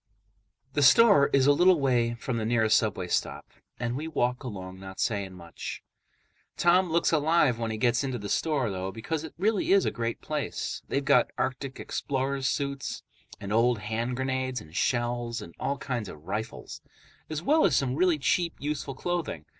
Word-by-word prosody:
The 145 - +1
store 170 +1 +7
is 135 -1 +4
a 145 - +6
little 175 +3 +5
way 120 -4 +1
from 120 +1 -3
the 110 - -2
nearest 110 -1 +3
subway 100 -5 0
stop, - - -1 0.3
and 120 0 -2
we 155 +4 -4
walk 125 -4 -1
along 95 -6 -7
not 95 0 -10
saying 100 -4 -1
much. 85 -2 -8 0.7
Tom 180 +1 +4
looks 170 +1 +2
alive 155 -5 +3
when 115 -1 -2
he 110 - -3
gets 120 +2 +2
into 130 -2 -2
the 105 -3 -6
store, 140 -1 0
though, 95 0 -4
because 145 +9 -4
it 160 - -9
really 205 +2 +1
is 195 -1 +5
a - - +1
great 115 -1 -3
place. 150 -2 -4
They've 140 0 -1
got - - +4
arctic 130 +1 -3
explorers' 135 -1 -2
suits 140 -1 -3 0.4
and 100 0 -4
old 120 +1 +3
hand 115 +4 -3
grenades 130 -1 -2
and 80 -5 -14
shells 120 +2 0
and 85 - -10
all 140 - -1
kinds 120 -6 -4
of 75 +1 -12
rifles, 110 +4 -5 0.5
as 155 0 -4
well 310 - +4
as 160 - +3
some 130 -1 +1
really 175 0 +3
cheap, 170 +4 0
useful 145 -2 -4
clothing. 170 - -3
130 Hz, 180 wpm, -28 LUFS, 110-150 Hz, 0.7 s, store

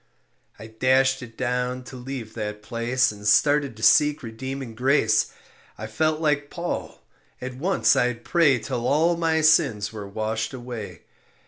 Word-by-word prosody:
I - - -10
dashed 130 +4 +2
it 115 -2 -11
down 125 0 -2
to 130 - -11
leave 125 -3 -7
that 105 -1 -5
place 120 +2 0
And 105 0 -7
started 140 +2 +3
to 110 - -9
seek 150 +3 +4
redeeming 130 +2 -6
grace. 125 -2 +2 0.5
I 110 - -6
felt 155 +8 0
like 150 -2 0
Paul, 175 0 -5 0.4
at 125 0 -6
once 170 +10 +2
I'd 125 -1 0
pray 160 -7 +3
Till 120 0 -3
all 165 +5 +3
my 165 -1 +1
sins 115 -10 +3
were 105 -2 -7
washed 110 +4 -3
away. 120 -4 -8
125 Hz, 150 wpm, -24 LUFS, 110-145 Hz, 0.5 s, seek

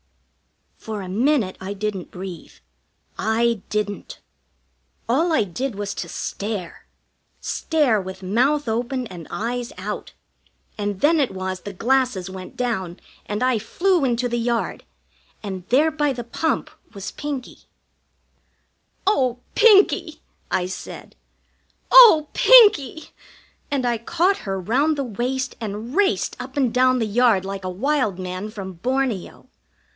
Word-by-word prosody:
For 215 -3 -5
a - - -7
minute 225 0 +1
I 190 +2 -4
didn't 200 -3 -4
breathe. 180 -2 -8 0.7
I 225 0 +1
didn't. 210 -1 -3 0.9
All 315 +9 +2
I 310 - +3
did 230 +6 -4
was 205 0 -4
to - - -6
stare 200 -4 -5 0.5
stare 285 -10 +1
with 190 0 -8
mouth 255 +9 +1
open 245 +3 -1
and 175 -7 -9
eyes 240 +3 -3
out; - - -6 0.7
and 205 -2 -3
then 320 +2 +4
it 275 - +2
was 185 0 -4
the 205 - -7
glasses 235 -4 0
went 185 -1 -9
down 195 -8 -2 0.3
and 210 +3 -2
I 255 -3 +2
flew 350 - +1
into 245 -1 +1
the 240 0 -2
yard, 235 0 -1 0.6
and 190 -3 -6
there 295 +6 +4
by 295 -2 0
the 240 -1 -5
pump 315 +7 -2 0.2
was 200 0 -6
Pinkie. 285 -4 -6 1.4
"Oh, 260 - +2 0.2
Pinkie!" 420 -3 +4 0.3
I 180 - 0
said. 185 - -8 0.8
"Oh, 445 -12 +9
Pinkie!" 410 - +6 0.6
And 270 -3 -1
I 240 -2 0
caught 345 - +1
her 195 0 -1
round 275 - +1
the 280 - -1
waist 255 +3 -3
and 220 +5 -5
raced 405 -1 +1
up 260 +3 -8
and 255 -5 +2
down 255 0 +4
the 230 - 0
yard 215 -3 +3
like 195 0 -5
a 185 - -3
wild 225 0 0
man 185 +2 -5
from 195 -3 -7
Borneo. 245 +2 -2
235 Hz, 135 wpm, -22 LUFS, 195-270 Hz, 1.4 s, Oh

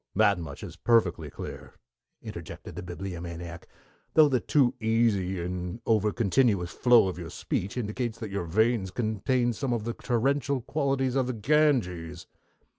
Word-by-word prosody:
"That 100 -3 +4
much 75 -4 -7
is - - -8
perfectly 90 -10 +2
clear," - - -8 0.5
interjected - - -8
the - - -5
Bibliomaniac, 85 -1 -7 0.5
"though 155 -1 +8
the 130 -3 +2
too 130 0 +2
easy 110 -5 +1
and 90 +3 -4
overcontinuous 105 -2 +2
flow 120 0 +5
of 90 -1 -4
your 85 -2 -6
speech 95 +6 -3
indicates 115 0 -2
that 110 -3 -6
your 100 -3 -2
veins 110 +3 +2
contain 120 +3 0
some 125 +3 -2
of 115 -3 -1
the 120 +1 -3
torrential 135 +3 0
qualities 135 -1 0
of 130 -2 +1
the 130 - -1
Ganges." 105 - +1
110 Hz, 145 wpm, -28 LUFS, 90-125 Hz, 0.5 s, though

